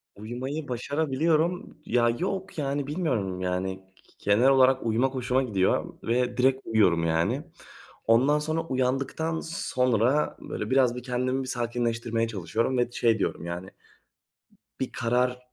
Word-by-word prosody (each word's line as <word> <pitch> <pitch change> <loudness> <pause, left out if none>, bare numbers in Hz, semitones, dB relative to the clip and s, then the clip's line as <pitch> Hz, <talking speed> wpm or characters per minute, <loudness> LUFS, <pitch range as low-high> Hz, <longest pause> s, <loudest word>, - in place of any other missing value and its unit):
Uyumayı 130 +8 -5
başarabiliyorum. 155 +7 0
Ya, 120 0 +3
yok, 190 -1 -3
yani, 140 -1 -1
bilmiyorum, 125 - -1
yani. 95 +1 -2 0.4
Genel 105 +6 +4
olarak 130 -1 +4
uyumak 120 +4 +1
hoşuma 125 +1 +1
gidiyor 100 -6 0
ve 120 +2 0
direkt 130 +1 +3
uyuyorum, 95 -7 +3
yani. 80 0 +1 0.6
Ondan 130 +7 +4
sonra, 155 +2 -1
uyandıktan 135 +3 -1
sonra 130 -3 +1
böyle 105 - -5
biraz 130 -2 +3
bir 125 - -6
kendimi 130 +1 -1
bir - - -7
sakinleştirmeye 115 -2 -1
çalışıyorum. 115 +5 -1
Ve 120 0 +1
şey 115 -2 +2
diyorum, 85 - -2
yani, 85 +2 -5 1.1
bir 130 - -2
karar 125 +1 0
125 Hz, 130 wpm, -27 LUFS, 115-135 Hz, 1.1 s, Genel